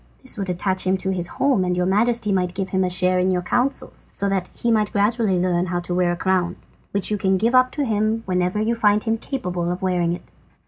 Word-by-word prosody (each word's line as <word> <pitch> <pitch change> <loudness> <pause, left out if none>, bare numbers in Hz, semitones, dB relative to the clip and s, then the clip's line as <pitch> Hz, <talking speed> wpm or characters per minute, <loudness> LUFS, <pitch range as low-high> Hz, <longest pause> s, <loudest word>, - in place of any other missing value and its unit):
This 260 - -1
would 195 -3 -4
attach 185 +1 -1
him 190 +1 +2
to 190 0 -2
his 175 -2 -1
home, 265 -2 +1
and 180 0 -1
your 180 - +1
Majesty 215 +3 +2
might 180 -2 0
give 190 -1 -3
him 190 -1 +1
a 185 - 0
share 185 0 +2
in 185 +1 +2
your 180 -1 0
counsels, 245 +9 -2
so 200 - -2
that 190 -2 -1
he 235 - 0
might 215 -2 +2
gradually 205 -1 +1
learn 180 0 +1
how 175 0 -1
to 175 0 -4
wear 180 -1 +2
a - - -5
crown, 185 -1 0 0.3
which 200 +1 -1
you 210 - 0
can 190 0 +2
give 230 +5 +1
up 255 0 +5
to 290 - -1
him 220 0 0
whenever 180 +1 0
you 220 +2 +1
find 210 -2 +2
him 225 -1 -1
capable 180 -11 -3
of 180 +2 -5
wearing 175 -2 +1
it." 175 - -9
190 Hz, 245 wpm, -22 LUFS, 180-215 Hz, 0.3 s, up